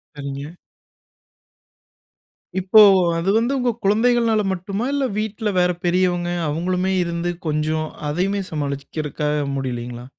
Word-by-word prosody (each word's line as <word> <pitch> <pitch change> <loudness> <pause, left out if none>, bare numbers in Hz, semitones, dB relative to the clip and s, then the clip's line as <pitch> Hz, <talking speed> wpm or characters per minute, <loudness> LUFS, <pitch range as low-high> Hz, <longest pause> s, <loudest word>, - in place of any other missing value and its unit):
சரிங்க. 140 0 -6 2.1
இப்போ, 195 +4 +6 0.4
அது 175 +4 -1
வந்து 235 +4 +1
உங்க 245 -1 +1
குழந்தைகள்னால 225 +1 +3
மட்டுமா? 200 +5 -3
இல்ல 280 -1 +1
வீட்ல 215 0 -2
வேற 180 0 +3
பெரியவங்க 175 -1 +1 0.2
அவங்களுமே 180 +4 -1
இருந்து 170 +1 -2 0.2
கொஞ்சம், 155 +1 -1 0.2
அதையுமே 195 +6 0
சமாளிக்குறதுக்காக 150 +1 -3 0.2
முடிலைங்களா? 120 -2 -4
175 Hz, 100 wpm, -21 LUFS, 150-205 Hz, 2.1 s, இப்போ